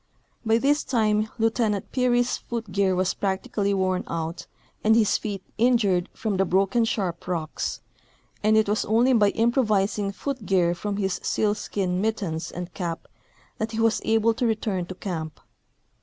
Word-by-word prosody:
By 220 0 +3
this 285 +5 +2
time 215 -3 +1
Lieu 225 0 +2
tenant 215 -4 -1
Peary's 245 -1 +2
foot 230 -4 -6
gear 195 -1 +2
was 185 0 +1
practically 200 +1 -1
w^orn 185 -2 0
out 165 +1 -4 0.4
and 220 +1 +5
his 220 -3 +3
feet 200 -3 -5 0.2
injured 215 -7 +3
from 210 -4 -2
the 195 - +3
broken 195 +6 +2
sharp 185 -7 -2
rocks, 165 -4 -3 0.6
and 215 +1 +4
it 220 - +3
was 210 +1 +1
only 235 +4 +3
by 210 -4 +5
im 230 +3 +2
provising 210 -4 +1
foot 260 +3 -5
gear 175 -3 +3
from 200 +3 -4
his 195 -2 -1
sealskin 200 -3 -1
mittens 195 -7 -2
and 180 0 -7
cap 170 -4 -4 0.5
that 220 +1 -2
he 220 - -2
was 225 0 +2
able 225 +1 +3
to 240 +2 0
return 210 -5 -1
to 185 - -7
camp. 160 -5 -5
205 Hz, 165 wpm, -25 LUFS, 185-225 Hz, 0.6 s, and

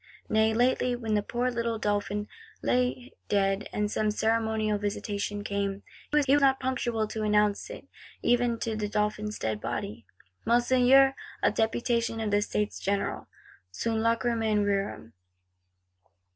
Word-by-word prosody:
Nay 220 0 +3
lately, 245 +2 +2
when 225 -3 -3
the 210 - +3
poor 245 +4 -1
little 235 -1 -1
Dauphin 205 -1 -1 0.4
lay 250 0 0 0.2
dead, 195 0 +1
and 210 0 -1
some 215 - +1
ceremonial 220 -1 0
Visitation 205 0 -3
came, 200 -1 -2 0.3
was 295 -1 +3
he 275 +1 +5
not 270 -2 +3
punctual 240 -4 -1
to 220 +1 -5
announce 210 -1 +1
it - - -9 0.4
even 240 -1 +2
to 225 -1 -2
the 210 -1 -2
Dauphin's 210 0 -1
dead 110 -1 -2
body: 105 0 -5 0.4
'Monseigneur, 255 +3 +5 0.3
a - - +4
Deputation 230 0 0
of 220 -2 -2
the 205 0 +3
States 210 0 -2
General!' 200 +1 -2 0.4
_Sunt 225 - -2
lachrymæ 225 -2 +1
rerum. 195 - -2
220 Hz, 135 wpm, -28 LUFS, 205-240 Hz, 0.4 s, he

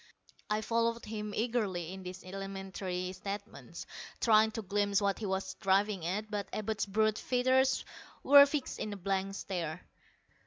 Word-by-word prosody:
I 210 0 +1
followed 230 +1 0
him 210 -1 -4
eagerly 205 -7 -1
in 190 - -8
these 185 0 -8
elementary 190 -1 -4
statements, 200 +3 -7 0.3
trying 220 -1 +5
to 225 - -4
glimpse 200 0 +1
what 200 -2 0
he 215 - -3
was 190 0 -2
driving 195 -2 +2
at, 210 +4 -3
but 205 -1 -3
Abud's 215 -1 -2
brute 215 +2 +2
features 260 +1 +2 0.4
were 285 0 +9
fixed 285 -2 -3
in 210 - -3
a - - -6
blank 195 +1 -1
stare. 175 -4 -4
200 Hz, 150 wpm, -32 LUFS, 190-220 Hz, 0.4 s, were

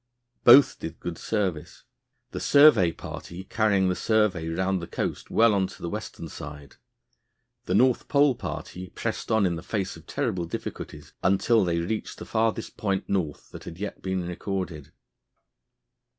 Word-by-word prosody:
Both 135 +3 +7
did 80 0 -7
good 85 -2 -5
service, 95 -8 -3 0.5
the - - -4
survey 140 - +6
party 85 +2 -8
carrying 100 -2 +2
the 90 - +1
survey 105 -7 +1
round 95 +3 -1
the 85 - -6
coast - - -4
well 115 -1 +4
on 95 -2 +1
to - - -13
the 85 - -3
western 105 -5 -6
side. 75 -1 -10 0.9
The - - 0
North 130 -1 +3
Pole 140 -1 +4
party 95 -6 -7
pressed - - -4
on 110 -3 +3
in 85 -2 0
the - - -7
face 95 +1 -3
of 80 0 -15
terrible 105 -11 -2
difficulties 85 - -7
until 100 +4 +3
they 85 -2 0
reached 90 +6 -3
the - - -8
farthest 110 0 -1
point 100 -3 -2
North 85 -7 -2
that - - -10
had 80 - -8
yet 100 +1 -6
been 95 -2 -2
recorded. 90 -4 -4
95 Hz, 160 wpm, -26 LUFS, 85-110 Hz, 0.9 s, Both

